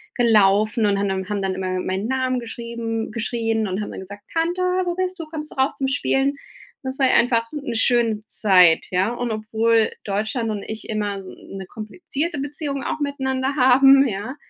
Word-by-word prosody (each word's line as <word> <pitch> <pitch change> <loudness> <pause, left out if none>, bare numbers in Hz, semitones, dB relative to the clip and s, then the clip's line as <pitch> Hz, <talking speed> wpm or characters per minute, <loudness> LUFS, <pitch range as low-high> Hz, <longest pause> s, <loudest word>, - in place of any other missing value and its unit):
gelaufen 215 -1 +3
und 200 -1 +2
haben 200 - 0
dann 190 +1 -3
haben 205 -1 -1
dann 190 -1 -1
immer 185 -1 -2
meinen 190 +4 -2
Namen 260 -1 0
geschrieben 230 -1 -5
geschrien 225 -1 -1
und 190 +2 -3
haben - - -5
dann - - -7
gesagt: 200 +2 -11
„Tante, 335 +2 0
wo 365 -1 0
bist 370 0 -2
du? - - -6
Kommst 305 -1 -7
du - - -18
raus 265 +1 +1
zum 270 - -1
Spielen?“ 275 +1 +1 0.5
Das 260 +1 -3
war 265 - +4
einfach 230 -1 +3
'ne 280 -5 -4
schöne 225 -3 +2
Zeit, 180 -5 +4
ja. 185 +4 +2
Und 240 -1 -3
obwohl 220 +1 +1
Deutschland 220 +3 -1
und 205 -2 -4
ich 220 0 -6
immer 205 -2 -2
s 195 - -11
'ne 190 0 -9
komplizierte 285 - -5
Beziehung 285 0 -4
auch 310 - -3
miteinander 265 -1 -1
haben, 270 +1 +6
ja. 210 +6 -4
230 Hz, 185 wpm, -22 LUFS, 210-270 Hz, 0.5 s, haben